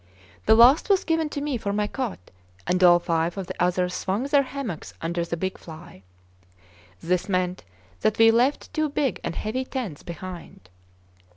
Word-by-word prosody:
The -, -, +7 dB
last 250 Hz, -, +6 dB
was 390 Hz, -1 st, +3 dB
given 325 Hz, -2 st, 0 dB
to 285 Hz, -, -4 dB
me 290 Hz, -3 st, -1 dB
for 200 Hz, -2 st, -2 dB
my 210 Hz, +1 st, 0 dB
cot, 215 Hz, -, -5 dB, 0.3 s
and 180 Hz, +1 st, +1 dB
all 175 Hz, -1 st, +8 dB
five 170 Hz, 0 st, -1 dB
of 195 Hz, -, -3 dB
the 185 Hz, 0 st, -3 dB
others 180 Hz, 0 st, 0 dB
swung 195 Hz, +6 st, -2 dB
their 280 Hz, +1 st, +3 dB
hammocks 260 Hz, -, -6 dB
under 170 Hz, +1 st, -2 dB
the 170 Hz, 0 st, -4 dB
big 190 Hz, +2 st, -3 dB
fly. 160 Hz, -, -12 dB, 1.0 s
This 180 Hz, +3 st, 0 dB
meant 185 Hz, -1 st, -1 dB, 0.4 s
that 215 Hz, -, +1 dB
we 225 Hz, 0 st, +7 dB
left 250 Hz, +7 st, +1 dB
two 310 Hz, -1 st, 0 dB
big 280 Hz, -2 st, -1 dB
and -, -, -4 dB
heavy 245 Hz, +5 st, -2 dB
tents 245 Hz, -, -5 dB
behind. 170 Hz, -, -9 dB
195 Hz, 175 wpm, -25 LUFS, 175-260 Hz, 1.0 s, all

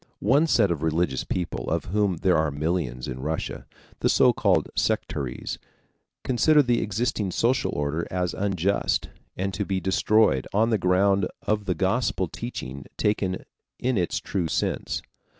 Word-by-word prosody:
One 140 Hz, +10 st, +3 dB
set 105 Hz, -, +3 dB
of 80 Hz, -4 st, -2 dB
religious 80 Hz, -4 st, 0 dB
people 85 Hz, -9 st, -3 dB
of -, -, -1 dB
whom 100 Hz, -1 st, +1 dB
there 95 Hz, -2 st, +4 dB
are 80 Hz, -1 st, +2 dB
millions 75 Hz, -4 st, -2 dB
in 65 Hz, -, -5 dB
Russia, 80 Hz, +4 st, -4 dB, 0.3 s
the -, -, +2 dB
so -, -, +5 dB
called -, -, +2 dB
sectaries, 65 Hz, -3 st, -2 dB, 0.6 s
consider 145 Hz, +5 st, +4 dB
the 120 Hz, -2 st, +1 dB
existing 105 Hz, -1 st, -1 dB
social 120 Hz, +8 st, +1 dB
order 75 Hz, +3 st, -1 dB
as 90 Hz, -1 st, -1 dB
unjust 100 Hz, -1 st, 0 dB, 0.3 s
and 95 Hz, +1 st, -2 dB
to 105 Hz, -, -1 dB
be 95 Hz, -1 st, -1 dB
destroyed 95 Hz, -5 st, +2 dB
on 110 Hz, +3 st, +3 dB
the 110 Hz, -, +2 dB
ground 95 Hz, +1 st, +3 dB, 0.2 s
of 105 Hz, -1 st, 0 dB
the 90 Hz, -3 st, 0 dB
Gospel -, -, 0 dB
teaching 70 Hz, +2 st, -7 dB
taken 95 Hz, -3 st, 0 dB, 0.3 s
in 130 Hz, 0 st, 0 dB
its 90 Hz, -4 st, 0 dB
true 90 Hz, -4 st, -2 dB
sense. -, -, -2 dB
95 Hz, 150 wpm, -25 LUFS, 80-105 Hz, 0.6 s, so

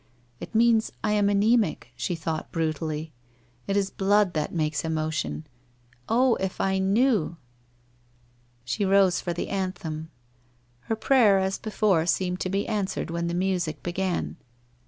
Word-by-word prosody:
'Jt -, -, -8 dB
means 230 Hz, -1 st, +4 dB
I 210 Hz, -, +1 dB
am, 205 Hz, -1 st, +3 dB
ana?mic!' 205 Hz, -, +2 dB
she 125 Hz, +8 st, -2 dB
thought 160 Hz, -1 st, -4 dB
brutally. 155 Hz, -1 st, -2 dB, 0.3 s
* 120 Hz, 0 st, -35 dB
It 200 Hz, -, +1 dB
is 200 Hz, -1 st, 0 dB
blood 200 Hz, -1 st, +2 dB
that 155 Hz, -1 st, -1 dB
makes 155 Hz, -3 st, -1 dB
emotion. 155 Hz, -1 st, -2 dB, 0.6 s
Oh, 250 Hz, +2 st, +4 dB
if 190 Hz, -1 st, -3 dB
I 190 Hz, 0 st, +1 dB
knew?' 200 Hz, -3 st, +2 dB, 1.3 s
She 125 Hz, +11 st, -1 dB
rose 195 Hz, -2 st, +4 dB
for 175 Hz, -, -3 dB
the 170 Hz, -, -3 dB
anthem. 165 Hz, -5 st, -3 dB, 0.8 s
Her 225 Hz, -, +2 dB
prayer 220 Hz, -4 st, +4 dB
as 190 Hz, 0 st, 0 dB
before 205 Hz, -6 st, +1 dB
seemed 180 Hz, 0 st, 0 dB
to 185 Hz, -, -2 dB
be 195 Hz, +2 st, 0 dB
answered 205 Hz, -5 st, -2 dB
when 170 Hz, 0 st, -2 dB
the 170 Hz, -, -2 dB
music 180 Hz, -5 st, -1 dB
began. 185 Hz, 0 st, -2 dB
185 Hz, 145 wpm, -26 LUFS, 160-205 Hz, 1.3 s, means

